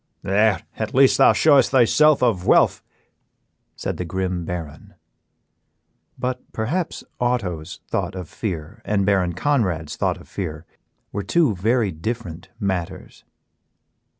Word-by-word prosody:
"There 105 Hz, +1 st, +2 dB
at 110 Hz, +1 st, -3 dB
least 135 Hz, 0 st, +5 dB
thou -, -, +7 dB
showest 145 Hz, -4 st, +4 dB
thyself 135 Hz, +3 st, +4 dB
a 120 Hz, -2 st, +4 dB
Vuelph," 90 Hz, -1 st, +3 dB, 0.9 s
said -, -, -4 dB
the -, -, -3 dB
grim 90 Hz, 0 st, -3 dB
Baron. 80 Hz, -5 st, -7 dB, 1.2 s
But 125 Hz, 0 st, -3 dB
perhaps 155 Hz, +11 st, -2 dB, 0.2 s
Otto's 95 Hz, -10 st, -2 dB
thought 95 Hz, -, -2 dB
of 90 Hz, -3 st, -6 dB
fear 95 Hz, +2 st, -5 dB
and 100 Hz, -2 st, 0 dB
Baron 95 Hz, -3 st, +2 dB
Conrad's 90 Hz, -, -1 dB
thought -, -, 0 dB
of -, -, -15 dB
fear 80 Hz, -4 st, -5 dB, 0.5 s
were 100 Hz, -, -3 dB
two 150 Hz, -, +2 dB
very 110 Hz, +2 st, +1 dB
different 90 Hz, 0 st, -5 dB
matters. 95 Hz, -5 st, -4 dB
100 Hz, 125 wpm, -22 LUFS, 90-120 Hz, 1.2 s, thou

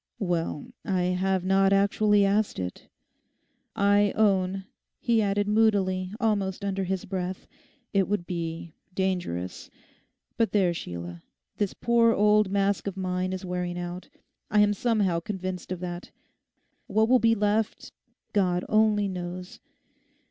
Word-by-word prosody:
'Well, 170 Hz, -6 st, -2 dB
I 185 Hz, -2 st, 0 dB
have 190 Hz, 0 st, 0 dB
not 195 Hz, +1 st, +3 dB
actually 200 Hz, +1 st, +3 dB
asked 205 Hz, +2 st, +1 dB
it. 90 Hz, -1 st, -5 dB, 0.9 s
I 205 Hz, 0 st, +3 dB
own,' 195 Hz, -2 st, +2 dB, 0.3 s
he 230 Hz, -2 st, +2 dB
added 205 Hz, 0 st, 0 dB
moodily, 200 Hz, -4 st, +2 dB
almost 200 Hz, -4 st, 0 dB
under 195 Hz, -1 st, -1 dB
his 190 Hz, 0 st, -2 dB
breath, 185 Hz, 0 st, -4 dB, 0.5 s
'it 195 Hz, -2 st, +3 dB
would 200 Hz, -4 st, -1 dB
be—dangerous.... 170 Hz, -, -4 dB, 0.7 s
But 230 Hz, -1 st, +1 dB
there, 190 Hz, -4 st, +3 dB
Sheila, 85 Hz, -, -7 dB, 0.4 s
this 205 Hz, -3 st, -1 dB
poor 230 Hz, -1 st, +3 dB
old 210 Hz, -1 st, +4 dB
mask 200 Hz, +1 st, 0 dB
of 195 Hz, -1 st, -4 dB
mine 185 Hz, 0 st, -1 dB
is 185 Hz, 0 st, -5 dB
wearing 180 Hz, -1 st, -3 dB
out. 175 Hz, +1 st, -6 dB, 0.4 s
I 210 Hz, -, +4 dB
am 205 Hz, 0 st, +4 dB
somehow 205 Hz, -6 st, +1 dB
convinced 185 Hz, -1 st, -5 dB
of 185 Hz, -1 st, -4 dB
that. 175 Hz, 0 st, -6 dB, 0.8 s
What 220 Hz, +2 st, +2 dB
will 255 Hz, +1 st, +5 dB
be 225 Hz, -1 st, +4 dB
left, 210 Hz, +1 st, -1 dB, 0.4 s
God 180 Hz, -3 st, +1 dB
only 215 Hz, -1 st, +3 dB
knows. 180 Hz, -1 st, -6 dB
195 Hz, 130 wpm, -27 LUFS, 180-205 Hz, 0.9 s, will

